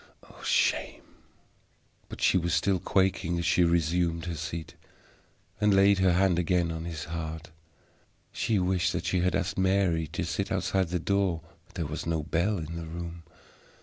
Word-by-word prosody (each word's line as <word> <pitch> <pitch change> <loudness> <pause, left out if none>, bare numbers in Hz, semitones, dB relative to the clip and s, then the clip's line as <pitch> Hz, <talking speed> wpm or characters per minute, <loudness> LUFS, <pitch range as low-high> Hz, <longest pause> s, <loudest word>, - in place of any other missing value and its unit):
Oh, - - -16
shame!" - - +1 1.1
But - - -9
she - - +4
was 85 -2 +1
still 95 +2 +1
quaking 95 -2 +1
as 85 - -2
she 90 +2 +4
resumed 85 0 +1
her 85 - -3
seat, 80 +1 -5 0.9
and 105 -1 +4
laid 100 0 +5
her 95 -2 +4
hand 90 -1 +3
again 90 -1 +1
on 80 0 -5
his 80 -2 -5
heart. 80 0 -6 0.8
She 115 -3 0
wished 90 -1 +1
that - - -3
she 90 - +1
had 90 +1 +1
asked 90 0 -1
Mary 95 -4 +2
to 85 +4 -4
sit 85 +3 -2
outside 95 0 0
the 90 +2 -1
door; 95 -1 0 0.3
there 80 - -2
was 75 +3 -5
no 80 -2 0
bell 85 +6 0
in 85 0 -5
the 85 -1 -6
room. 85 +1 -6
85 Hz, 170 wpm, -28 LUFS, 85-95 Hz, 1.1 s, laid